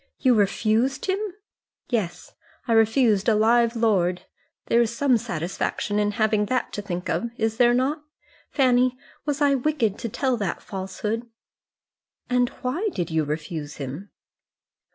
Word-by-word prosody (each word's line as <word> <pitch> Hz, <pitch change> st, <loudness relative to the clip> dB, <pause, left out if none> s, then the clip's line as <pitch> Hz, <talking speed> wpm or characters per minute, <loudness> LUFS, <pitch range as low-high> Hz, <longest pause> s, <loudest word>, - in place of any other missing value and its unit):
"You 255 Hz, -3 st, +3 dB
refused 220 Hz, +5 st, +1 dB
him?" 380 Hz, +1 st, 0 dB, 0.7 s
"Yes; 185 Hz, -8 st, -3 dB, 0.3 s
I 230 Hz, -, +2 dB
refused 225 Hz, -1 st, +3 dB
a 220 Hz, -, +4 dB
live 230 Hz, +2 st, +3 dB
lord. 185 Hz, -6 st, +1 dB, 0.4 s
There 235 Hz, -, +3 dB
is 235 Hz, -, +2 dB
some 275 Hz, -2 st, +3 dB
satisfaction 205 Hz, 0 st, -2 dB
in 205 Hz, 0 st, +1 dB
having 215 Hz, -1 st, +1 dB
that 255 Hz, +2 st, -1 dB
to 205 Hz, -, -3 dB
think 180 Hz, -2 st, -4 dB
of, 235 Hz, +6 st, -1 dB
is 225 Hz, 0 st, -1 dB
there 240 Hz, -1 st, +5 dB
not? 275 Hz, +5 st, 0 dB, 0.5 s
Fanny, 255 Hz, -2 st, +3 dB, 0.3 s
was 295 Hz, 0 st, -1 dB
I 285 Hz, -1 st, +4 dB
wicked 255 Hz, -6 st, 0 dB
to 230 Hz, -, -3 dB
tell 260 Hz, +3 st, 0 dB
that 200 Hz, -5 st, -3 dB
falsehood?" 210 Hz, +4 st, -4 dB, 1.0 s
"And 245 Hz, -1 st, +3 dB
why 325 Hz, +13 st, 0 dB
did 175 Hz, -3 st, -2 dB
you 160 Hz, -1 st, +1 dB
refuse 150 Hz, 0 st, -4 dB
him?" 145 Hz, +8 st, -7 dB
225 Hz, 145 wpm, -24 LUFS, 195-250 Hz, 1.0 s, there